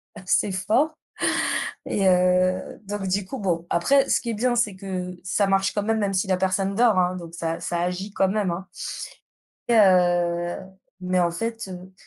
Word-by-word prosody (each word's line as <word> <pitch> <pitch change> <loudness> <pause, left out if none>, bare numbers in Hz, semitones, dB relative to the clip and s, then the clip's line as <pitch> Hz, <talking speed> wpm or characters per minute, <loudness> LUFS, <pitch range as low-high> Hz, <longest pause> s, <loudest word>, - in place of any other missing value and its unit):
assez 195 0 0
forts 220 +12 +1 0.9
et 195 -1 0
heu, 185 0 +2
donc 200 -1 -4
du 190 +1 0
coup 265 +8 -6
bon 175 -5 -1
après 270 +11 +3
ce - - +3
qui 235 - -4
est - - -2
bien 240 +3 +1
c'est 215 -5 0
que 185 -1 -5
ça 200 +2 +1
marche 195 0 +2
quand 205 - 0
même, 220 +1 0
même 200 -2 0
si 190 +2 +1
la 185 - +2
personne 190 +1 0
dort, 225 -4 +4
hein, 180 0 +2
donc 170 -2 -9
ça 165 -1 -3
ça 170 -1 -2
agit 180 +3 -3
quand 195 - +2
même, 200 -1 0
hein 180 +2 -5 1.0
et 235 - +4
heu, 175 -3 +3 0.4
mais 185 0 +1
en 170 -1 +2
fait, 225 +3 -4
heu, 185 +1 -9
190 Hz, 190 wpm, -24 LUFS, 180-205 Hz, 1.0 s, dort